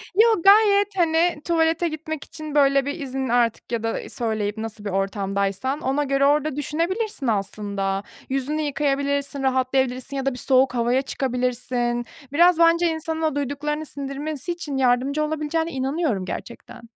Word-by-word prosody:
Yo, 445 Hz, -2 st, +5 dB
gayet, 405 Hz, 0 st, +6 dB
hani, 330 Hz, -2 st, +2 dB
tuvalete 330 Hz, 0 st, +2 dB
gitmek 315 Hz, -1 st, -5 dB
için 310 Hz, -2 st, -8 dB
böyle 275 Hz, -2 st, +4 dB
bir 285 Hz, +4 st, -4 dB
izin 265 Hz, -2 st, -3 dB
artık 235 Hz, -1 st, +1 dB
ya 230 Hz, -2 st, -1 dB
da 225 Hz, -, -3 dB
söyleyip 220 Hz, -3 st, -2 dB
nasıl 220 Hz, -1 st, -6 dB
bir -, -, -1 dB
ortamdaysan 195 Hz, +6 st, -1 dB
ona 270 Hz, +3 st, 0 dB
göre 275 Hz, 0 st, +2 dB
orada 295 Hz, 0 st, +2 dB
düşünebilirsin 335 Hz, -, -2 dB
aslında. 200 Hz, -2 st, -2 dB, 0.3 s
Yüzünü 275 Hz, +3 st, -1 dB
yıkayabilirsin, 280 Hz, -1 st, -1 dB
rahatlayabilirsin 260 Hz, 0 st, 0 dB
ya 270 Hz, -, -3 dB
da 275 Hz, -, +1 dB
bir 250 Hz, -, -8 dB
soğuk 260 Hz, 0 st, +3 dB
havaya 240 Hz, +2 st, +2 dB
çıkabilirsin. 245 Hz, -2 st, -1 dB, 0.3 s
Biraz 345 Hz, +2 st, +5 dB
bence 335 Hz, +1 st, +5 dB
insanın 320 Hz, 0 st, -3 dB
o 310 Hz, -3 st, 0 dB
duyduklarını 290 Hz, +2 st, -2 dB
sindirmesi 285 Hz, +3 st, -5 dB
için 315 Hz, -5 st, -4 dB
yardımcı 265 Hz, +3 st, +2 dB
olabileceğine 315 Hz, +2 st, -1 dB
inanıyorum 265 Hz, -, -1 dB
gerçekten. 235 Hz, +5 st, -8 dB
275 Hz, 145 wpm, -23 LUFS, 245-315 Hz, 0.3 s, gayet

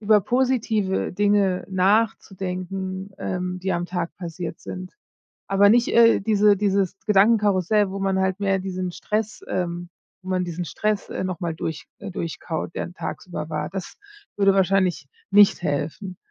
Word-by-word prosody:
über 210 Hz, 0 st, +4 dB
positive 225 Hz, -5 st, 0 dB
Dinge 200 Hz, -2 st, +2 dB
nachzudenken, 190 Hz, -1 st, -1 dB
ähm, 180 Hz, 0 st, -3 dB
die 190 Hz, +1 st, -1 dB
am 175 Hz, 0 st, -1 dB
Tag 175 Hz, -2 st, -3 dB
passiert 170 Hz, -1 st, -6 dB
sind. 185 Hz, 0 st, -7 dB, 0.6 s
Aber 200 Hz, +1 st, +5 dB
nicht, 235 Hz, +2 st, +4 dB
äh, 230 Hz, 0 st, +5 dB
diese 210 Hz, 0 st, +4 dB
dieses 195 Hz, -2 st, +1 dB
Gedankenkarussell, 205 Hz, -1 st, +3 dB
wo 195 Hz, -, -4 dB
man 195 Hz, -1 st, +1 dB
halt 190 Hz, +1 st, 0 dB
mehr 195 Hz, -1 st, +1 dB
diesen 185 Hz, -1 st, -3 dB
Stress, 215 Hz, +4 st, -3 dB
ähm 175 Hz, -1 st, -3 dB, 0.3 s
wo 185 Hz, -, -8 dB
man 185 Hz, -1 st, +1 dB
diesen 175 Hz, 0 st, -4 dB
Stress, 210 Hz, +4 st, -2 dB
äh, -, -, -3 dB
noch 185 Hz, -2 st, -3 dB
mal 170 Hz, -3 st, -2 dB
durch 160 Hz, -1 st, -5 dB
äh, 200 Hz, -, -7 dB
durchkaut, 165 Hz, 0 st, -4 dB
der -, -, -4 dB
tagsüber 170 Hz, -3 st, -6 dB
war, 150 Hz, -1 st, -3 dB
das 190 Hz, +1 st, -6 dB, 0.4 s
würde 195 Hz, -1 st, +4 dB
wahrscheinlich 185 Hz, -6 st, +2 dB, 0.2 s
nicht 200 Hz, -2 st, +6 dB
helfen. 165 Hz, +5 st, -3 dB
190 Hz, 150 wpm, -23 LUFS, 180-205 Hz, 0.6 s, nicht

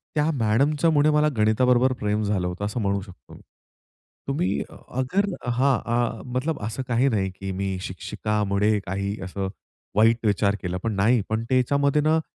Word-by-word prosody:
त्या 150 Hz, +1 st, +2 dB
मॅडमच्यामुळे 145 Hz, +7 st, +3 dB
मला 150 Hz, 0 st, +3 dB
गणिताबरोबर 125 Hz, +4 st, +3 dB
प्रेम 105 Hz, +1 st, 0 dB
झालं 100 Hz, -3 st, 0 dB
होतं 90 Hz, +3 st, -4 dB
असं 105 Hz, +4 st, -3 dB
म्हणू 100 Hz, 0 st, 0 dB
शकतो 95 Hz, -3 st, -14 dB
मी. -, -, -13 dB, 0.9 s
तुम्ही 120 Hz, -9 st, 0 dB, 0.3 s
अगर 130 Hz, +11 st, 0 dB, 0.2 s
हां, 130 Hz, +1 st, +2 dB
आह. 120 Hz, -1 st, 0 dB
मतलब 130 Hz, +5 st, -2 dB
असं 110 Hz, +5 st, -3 dB
काही 125 Hz, +3 st, +2 dB
नाही, 95 Hz, -4 st, 0 dB
की 95 Hz, 0 st, -6 dB
मी 95 Hz, 0 st, -2 dB
शिक्षिकामुळे 105 Hz, +2 st, -1 dB
काही 100 Hz, +2 st, -2 dB
असं 95 Hz, +1 st, -4 dB, 0.5 s
वाईट 115 Hz, +2 st, +3 dB
विचार 100 Hz, -1 st, +2 dB
केला 90 Hz, 0 st, -3 dB
पण 115 Hz, -2 st, -1 dB
नाही, 110 Hz, +4 st, +3 dB
पण 110 Hz, +1 st, -1 dB
त्याच्यामध्ये 140 Hz, +3 st, +2 dB
ना 155 Hz, +2 st, +3 dB
110 Hz, 155 wpm, -24 LUFS, 100-130 Hz, 0.9 s, मॅडमच्यामुळे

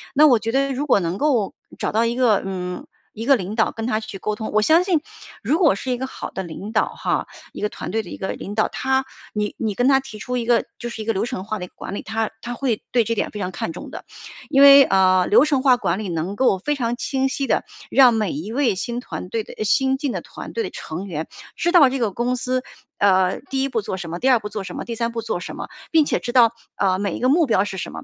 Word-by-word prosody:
那 300 Hz, +2 st, +7 dB
我 250 Hz, -6 st, +6 dB
觉 225 Hz, +2 st, -3 dB
得 275 Hz, +1 st, +1 dB
如 290 Hz, +3 st, -3 dB
果 205 Hz, -, +4 dB
能 175 Hz, +1 st, -3 dB
够 260 Hz, -9 st, +1 dB, 0.2 s
找 -, -, -2 dB
到 225 Hz, +2 st, +2 dB
一 235 Hz, -, 0 dB
个， 240 Hz, -5 st, +3 dB
嗯， 180 Hz, -2 st, -5 dB, 0.3 s
一 225 Hz, +1 st, -6 dB
个 275 Hz, +1 st, +6 dB
领 200 Hz, 0 st, -4 dB
导 220 Hz, -, +2 dB
跟 225 Hz, 0 st, -5 dB
他 215 Hz, -3 st, +1 dB
去 215 Hz, -3 st, -8 dB
沟 210 Hz, +2 st, -2 dB
通。 220 Hz, 0 st, -5 dB
我 215 Hz, -, +4 dB
相 320 Hz, +9 st, +5 dB
信 345 Hz, -6 st, +2 dB, 0.4 s
如 280 Hz, +9 st, +2 dB
果 325 Hz, -, +4 dB
是 255 Hz, +6 st, -4 dB
一 245 Hz, -, 0 dB
个 265 Hz, -, -3 dB
好 -, -, -7 dB
的 190 Hz, -, -5 dB
领 180 Hz, +5 st, -7 dB
导 -, -, +1 dB
哈， -, -, -2 dB, 0.2 s
一 -, -, -9 dB
个 210 Hz, -, +1 dB
团 -, -, -7 dB
队 225 Hz, -, 0 dB
的 175 Hz, -, -11 dB
一 -, -, -7 dB
个 190 Hz, -, -4 dB
领 205 Hz, +2 st, -7 dB
导， 215 Hz, -, +2 dB
他 265 Hz, 0 st, 0 dB, 0.3 s
你 210 Hz, -1 st, -2 dB
你 220 Hz, -3 st, -1 dB
跟 245 Hz, +5 st, +1 dB
他 270 Hz, -1 st, +5 dB
提 265 Hz, -6 st, -10 dB
出 250 Hz, +4 st, -3 dB
一 235 Hz, -, -2 dB
个 235 Hz, 0 st, +3 dB
就 240 Hz, -, -6 dB
是 225 Hz, -2 st, -6 dB
一 215 Hz, -, -6 dB
个 225 Hz, -, +1 dB
流 195 Hz, +1 st, -1 dB
程 190 Hz, -5 st, -4 dB
化 215 Hz, 0 st, -4 dB
的 180 Hz, -, -5 dB
一 -, -, -12 dB
个 -, -, -27 dB
管 -, -, -6 dB
理， -, -, -4 dB
他 220 Hz, 0 st, -2 dB
他 240 Hz, +1 st, -5 dB
会 245 Hz, -4 st, -1 dB
对 240 Hz, -2 st, +3 dB
这 230 Hz, +2 st, -2 dB
点 -, -, -1 dB
非 210 Hz, -, -7 dB
常 185 Hz, -2 st, -3 dB
看 165 Hz, -2 st, -4 dB
重 -, -, -8 dB
的， -, -, -9 dB, 0.4 s
因 275 Hz, -, +4 dB
为， 280 Hz, 0 st, +10 dB
啊， 185 Hz, -4 st, +4 dB
流 230 Hz, -, +6 dB
程 280 Hz, -4 st, +1 dB
化 260 Hz, -3 st, +6 dB
管 190 Hz, -5 st, -1 dB
理 215 Hz, -, -4 dB
能 175 Hz, +3 st, -3 dB
够 250 Hz, -7 st, +3 dB
非 295 Hz, +10 st, -1 dB
常 240 Hz, -3 st, -1 dB
清 265 Hz, +1 st, -1 dB
晰 275 Hz, +1 st, -2 dB
地 -, -, +1 dB, 0.3 s
让 255 Hz, -3 st, +6 dB
每 215 Hz, -4 st, 0 dB
一 180 Hz, +10 st, -5 dB
位 255 Hz, -7 st, +2 dB
新 235 Hz, +6 st, -3 dB
团 215 Hz, -, -7 dB
队 220 Hz, +3 st, -2 dB
的 -, -, -11 dB
呃 -, -, -2 dB
新 265 Hz, +5 st, +2 dB
进 280 Hz, -3 st, -2 dB
的 -, -, -3 dB
团 -, -, -10 dB
队 460 Hz, -, -1 dB
的 385 Hz, -, -4 dB
成 180 Hz, -, -6 dB
员 160 Hz, -3 st, -4 dB, 0.3 s
知 345 Hz, -, +1 dB
道 295 Hz, -7 st, +7 dB
这 265 Hz, 0 st, -3 dB
个 220 Hz, -4 st, 0 dB
公 245 Hz, +4 st, -1 dB
司， 255 Hz, +1 st, -1 dB, 0.4 s
呃， 190 Hz, -2 st, +3 dB
第 270 Hz, 0 st, 0 dB
1 275 Hz, -, -1 dB
步 230 Hz, -4 st, -1 dB
做 190 Hz, -, -4 dB
什 175 Hz, -2 st, -6 dB
么， 175 Hz, -, -4 dB
第 265 Hz, -, +2 dB
2 245 Hz, -, +5 dB
步 210 Hz, -, -6 dB
做 210 Hz, -, -5 dB
什 -, -, -8 dB
么， -, -, -5 dB
第 235 Hz, -, -5 dB
3 230 Hz, +1 st, -1 dB
步 230 Hz, -, -4 dB
做 220 Hz, -5 st, -3 dB
什 -, -, -7 dB
么， -, -, -5 dB, 0.2 s
并 315 Hz, -3 st, +5 dB
且 -, -, 0 dB
知 240 Hz, -, -4 dB
道 235 Hz, -2 st, +5 dB, 0.2 s
啊 190 Hz, -1 st, +1 dB
每 200 Hz, -4 st, -2 dB
一 -, -, -5 dB
个 250 Hz, -, +1 dB
目 315 Hz, +5 st, +4 dB
标 200 Hz, -3 st, +2 dB
是 190 Hz, -1 st, -5 dB
什 -, -, -5 dB
么。 -, -, -8 dB
230 Hz, 305 characters per minute, -22 LUFS, 200-265 Hz, 0.4 s, 为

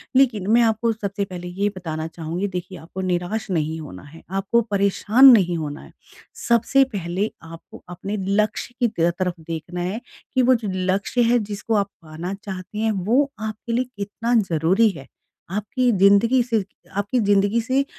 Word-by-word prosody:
लेकिन 235 Hz, -8 st, +3 dB
मैं 235 Hz, +1 st, +6 dB
आपको 225 Hz, 0 st, +2 dB
सबसे 200 Hz, -2 st, -3 dB
पहले 180 Hz, -2 st, -7 dB
ये 195 Hz, +3 st, -1 dB
बताना 160 Hz, -3 st, -4 dB
चाहूँगी 170 Hz, +4 st, -4 dB
देखिए 185 Hz, 0 st, -6 dB
आपको 170 Hz, +3 st, -8 dB
निराश 185 Hz, +4 st, -2 dB
नहीं 160 Hz, -2 st, -1 dB
होना 115 Hz, -12 st, -10 dB
है, 150 Hz, +3 st, -14 dB
आपको 195 Hz, +5 st, +1 dB
परेशान 200 Hz, +6 st, +5 dB
नहीं 180 Hz, -7 st, +4 dB
होना 150 Hz, -1 st, -5 dB
है। -, -, -14 dB, 0.6 s
सबसे 235 Hz, +3 st, +4 dB
पहले 190 Hz, +2 st, -2 dB
आपको 165 Hz, 0 st, -12 dB
अपने 195 Hz, +4 st, -5 dB, 0.2 s
लक्ष्य 215 Hz, +3 st, -4 dB
की 240 Hz, -, +3 dB
तेय 170 Hz, -5 st, +1 dB
तरफ 180 Hz, -1 st, 0 dB
देखना 165 Hz, +2 st, -6 dB
है 190 Hz, +6 st, -3 dB, 0.3 s
कि 260 Hz, -, +3 dB
वो 255 Hz, +1 st, +5 dB
जो 225 Hz, -4 st, -3 dB
लक्ष्य 190 Hz, +6 st, 0 dB
है 245 Hz, -, +4 dB
जिसको 210 Hz, +2 st, -2 dB
आप 200 Hz, -1 st, +1 dB
पाना 165 Hz, +4 st, -6 dB
चाहते 195 Hz, 0 st, -8 dB
हैं, 220 Hz, 0 st, +1 dB
वो 230 Hz, +9 st, +1 dB
आपके 220 Hz, +2 st, -5 dB
लिए 255 Hz, +2 st, +1 dB
कितना 225 Hz, +4 st, -2 dB, 0.2 s
ज़रूरी 180 Hz, +8 st, +3 dB
है। 135 Hz, -9 st, -9 dB, 0.4 s
आपकी 215 Hz, +5 st, 0 dB
ज़िन्दगी 200 Hz, +5 st, +4 dB
से 230 Hz, -4 st, 0 dB, 0.3 s
आपकी 205 Hz, +5 st, 0 dB
ज़िन्दगी 205 Hz, +1 st, +2 dB
से 265 Hz, +4 st, +1 dB
200 Hz, 170 wpm, -22 LUFS, 175-225 Hz, 0.6 s, मैं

